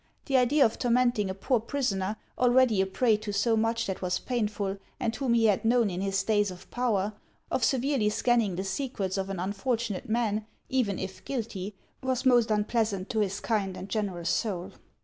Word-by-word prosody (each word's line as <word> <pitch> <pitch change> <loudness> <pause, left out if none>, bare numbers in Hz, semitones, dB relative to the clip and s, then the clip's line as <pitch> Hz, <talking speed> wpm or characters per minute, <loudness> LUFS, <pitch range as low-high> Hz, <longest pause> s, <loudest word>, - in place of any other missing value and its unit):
The 275 - 0
idea 260 +3 +5
of 225 - -1
tormenting 240 -4 +2
a 190 - -3
poor 245 +5 +1
prisoner, 215 -5 -1 0.2
already 245 -4 +4
a 190 - +1
prey 220 +3 +2
to 215 0 -5
so 215 +3 +2
much 225 +1 +1
that 190 -1 -4
was 180 -1 0
pain 240 -1 -1
ful, 200 -2 -3 0.2
and 230 0 -1
whom 260 -4 +1
he 230 -1 +4
had 210 -1 +3
known 230 -2 +3
in 180 +1 -3
his 195 0 0
days 205 -1 +2
of 180 0 -11
power, 215 -5 0 0.4
of - - 0
severely 265 -4 +2
scanning 225 -3 +2
the 190 - -2
secrets 195 -2 -2
of 195 0 -2
an 195 -2 -4
unfortunate 220 +3 -2
man, 220 -2 0 0.2
even 235 -8 +1
if 190 0 -6
guilty, 215 -6 -4 0.3
was 260 0 -1
most 240 -3 +5
unpleasant 210 -2 0
to 220 - 0
his 200 -2 0
kind 200 -5 -1
and 195 - -7
generous 185 -6 -1
soul. 185 -4 -2
215 Hz, 190 wpm, -28 LUFS, 195-240 Hz, 0.4 s, idea